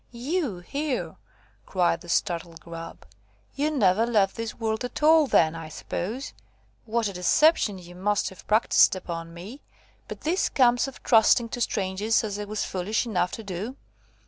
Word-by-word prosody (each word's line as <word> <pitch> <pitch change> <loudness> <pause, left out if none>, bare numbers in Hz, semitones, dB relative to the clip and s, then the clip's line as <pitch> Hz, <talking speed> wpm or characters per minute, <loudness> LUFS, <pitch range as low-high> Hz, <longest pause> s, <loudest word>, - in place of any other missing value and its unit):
"You 255 - -2
here!" 280 +7 -3 0.5
cried 175 -3 +1
the 175 - -12
startled 170 -2 -1
Grub; 165 0 -9 0.5
"you 290 +3 0
never 215 -8 +3
left 205 -5 +2
this 230 -1 -5
world 220 0 -2
at 245 +4 -5
all, 315 -1 +6
then, 160 -9 +3
I 165 -1 -7
suppose. 220 - -5 0.5
What 230 0 0
a 200 - -5
deception 205 - +3
you 175 -1 -12
must 205 +3 0
have 190 - -15
practised 215 -2 +4
upon 165 -2 -6
me! 195 +12 -10 0.5
But - - -8
this 345 +5 0
comes 245 -1 +3
of 270 - -11
trusting 230 +1 +4
to 245 - -5
strangers, 205 +1 0
as 205 -1 -4
I 210 - -4
was 210 +1 -3
foolish 195 +6 -1
enough 180 -6 0
to 225 - -6
do." 200 +6 -5
210 Hz, 165 wpm, -26 LUFS, 180-245 Hz, 0.5 s, all